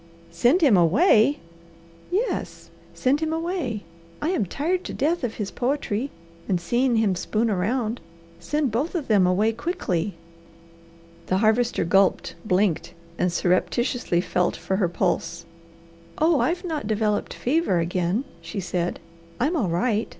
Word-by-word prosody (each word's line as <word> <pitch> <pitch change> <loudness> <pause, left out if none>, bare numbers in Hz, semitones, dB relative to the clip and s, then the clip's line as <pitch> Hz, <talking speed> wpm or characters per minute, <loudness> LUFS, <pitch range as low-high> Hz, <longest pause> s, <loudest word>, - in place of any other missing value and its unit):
"SEND 240 - +3
HIM 275 -10 +6
AWAY?" 220 - +4 0.7
"Yes, 415 +8 -2 0.2
send 270 +3 +2
him 315 0 -1
away! 325 - -2 0.4
I 305 - -1
am 320 - 0
tired 350 - -1
to - - -5
death 315 +4 0
of 235 -3 -2
his 205 -3 -4
poetry, 260 -2 -1 0.4
and 185 -3 +2
seeing 240 +7 +1
him 220 -4 +2
spoon 220 +5 0
around. 220 +5 -1 0.4
Send 295 -4 -1
both 275 - -1
of 315 -6 -2
them 200 -5 +4
away 205 +5 +2
quickly!" 215 - -2 1.1
The 185 - +1
Harvester 225 0 +2
gulped, 195 +3 +2
blinked, 190 -4 0 0.2
and 180 - +2
surreptitiously 185 +3 +1
felt 180 -1 0
for 190 - -2
her 185 -4 +1
pulse. 170 0 -1 0.7
"Oh, 315 -1 +3
I've 360 +2 0
not 310 -10 -3
developed 215 -1 0
fever 275 - +1
again," 175 +6 0 0.2
she 210 - -5
said. 180 -1 -2 0.4
"I'm 295 +8 +1
all 220 - 0
right. 210 +6 0
225 Hz, 140 wpm, -24 LUFS, 185-290 Hz, 1.1 s, HIM